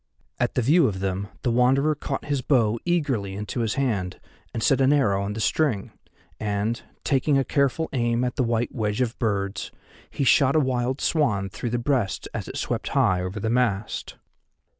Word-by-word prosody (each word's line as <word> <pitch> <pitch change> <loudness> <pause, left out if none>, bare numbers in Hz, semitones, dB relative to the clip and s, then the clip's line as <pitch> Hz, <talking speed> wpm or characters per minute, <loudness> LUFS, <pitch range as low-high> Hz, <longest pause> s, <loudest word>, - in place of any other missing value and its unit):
At 120 - 0
the 125 - +1
view 155 +4 +5
of 95 -4 -3
them 95 +1 -2 0.2
the 120 - +1
Wanderer 130 +5 +3
caught 140 -1 -4
his 145 -2 -1
bow 115 -4 +2
eagerly 135 - 0
into 105 +4 -4
his 115 -2 0
hand 105 -10 -1 0.3
and 115 - -3
set 135 -1 +3
an 135 +1 +4
arrow 110 -10 +2
on 100 +1 -3
the 110 - -5
string, 115 -3 0 0.5
and, 105 +2 -1 0.2
taking 140 +1 +2
a 135 - +3
careful 140 +4 +1
aim 120 -1 +1
at 125 - -1
the - - 0
white 120 0 0
wedge 105 -2 -1
of 120 -2 -1
birds, 100 -4 -1 0.4
he - - -2
shot 135 +1 +4
a - - +6
wild 130 -1 0
swan 105 - +1
through 105 +5 -4
the 120 - 0
breast 120 -5 -1
as - - -4
it - - -6
swept - - -2
high 90 -1 +3
over 90 +3 -4
the 110 +2 -1
mast. 115 -4 -1
120 Hz, 190 wpm, -25 LUFS, 105-135 Hz, 0.5 s, a